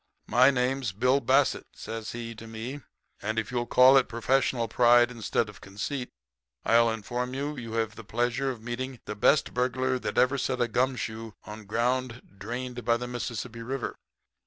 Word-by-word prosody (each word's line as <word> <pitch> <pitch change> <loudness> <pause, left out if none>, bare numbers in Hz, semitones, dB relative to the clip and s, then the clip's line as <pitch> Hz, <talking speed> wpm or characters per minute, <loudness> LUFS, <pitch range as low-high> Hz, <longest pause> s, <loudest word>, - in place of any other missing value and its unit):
"'My 130 +2 +5
name's 130 -4 0
Bill 125 +7 +3
Bassett,' 135 +2 +2
says 110 -1 -6
he 115 -1 -5
to 115 +1 -11
me, 115 +6 -6 0.4
'and 110 +2 -2
if 110 - -1
you'll 120 -1 -1
call 130 +2 +7
it 130 - +3
professional 120 0 +1
pride 120 +1 +5
instead 115 -1 -1
of 105 -1 -12
conceit, 120 +7 -4 0.6
I'll 115 0 +5
inform 120 +3 -3
you 145 +2 -2
that 135 - -7
you 115 -1 -7
have 110 -2 -1
the 115 - -9
pleasure 120 +5 0
of 120 -4 -6
meeting 125 +1 -4
the 105 - -5
best 140 +8 +3
burglar 130 +1 0
that - - -4
ever 130 +2 +3
set 130 0 -1
a 120 - +2
gum 130 +4 +1
shoe 110 0 -5
on 105 0 -9
ground 120 +1 -2
drained 125 +3 -5
by 115 0 +3
the 125 +1 -5
Mississippi 120 -1 -5
River.' 130 +2 -4
120 Hz, 185 wpm, -28 LUFS, 115-130 Hz, 0.6 s, call